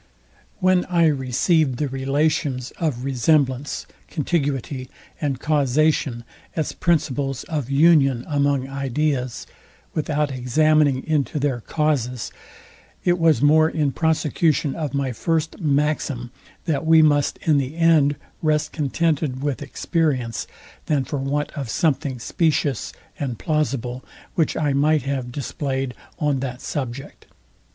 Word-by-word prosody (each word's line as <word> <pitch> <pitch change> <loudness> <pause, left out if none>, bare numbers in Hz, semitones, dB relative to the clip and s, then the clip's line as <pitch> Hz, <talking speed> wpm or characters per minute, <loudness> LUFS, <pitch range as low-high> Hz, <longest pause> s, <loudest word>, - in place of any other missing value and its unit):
When 185 -2 +3
I 170 -2 +3
received 140 0 +2
the 150 - 0
relations 135 -1 0
of 145 -7 -1
resemblance, 135 +1 +1 0.2
contiguity 140 -4 -2 0.3
and 140 -4 -1
causation, 145 -3 +1 0.3
as 155 -3 -1
principles 140 -5 0
of 145 -6 -3
union 140 -4 +4
among 140 -3 +1
ideas, 135 -1 -2 0.5
without 150 -1 0
examining 140 +2 +2
into 155 -2 0
their 140 -4 0
causes, 130 -5 -1 0.7
it 175 0 +2
was 160 -6 +3
more 155 +2 +5
in 150 -4 0
prosecution 155 -1 +1
of 150 -5 -3
my 135 -2 0
first 160 +5 -1
maxim, 145 -5 0 0.3
that 155 -2 0
we 160 0 +6
must 145 -2 +2
in 150 -3 +3
the 135 +3 -3
end 160 -4 +4 0.3
rest 155 -1 +1
contented 150 -2 -1
with 145 -2 -1
experience, 140 - -1 0.4
than 145 -3 +2
for 145 - -3
want 145 +2 -1
of 135 -5 -5
something 140 -1 0
specious 145 - 0 0.3
and 130 -6 -3
plausible, 135 -5 -1 0.3
which 165 -4 +1
I 145 -3 +1
might 150 +1 +3
have 130 -2 -3
displayed 135 -1 -3 0.2
on 145 -3 +1
that 130 -1 -4
subject. 135 -1 -6
145 Hz, 120 wpm, -22 LUFS, 130-155 Hz, 0.7 s, we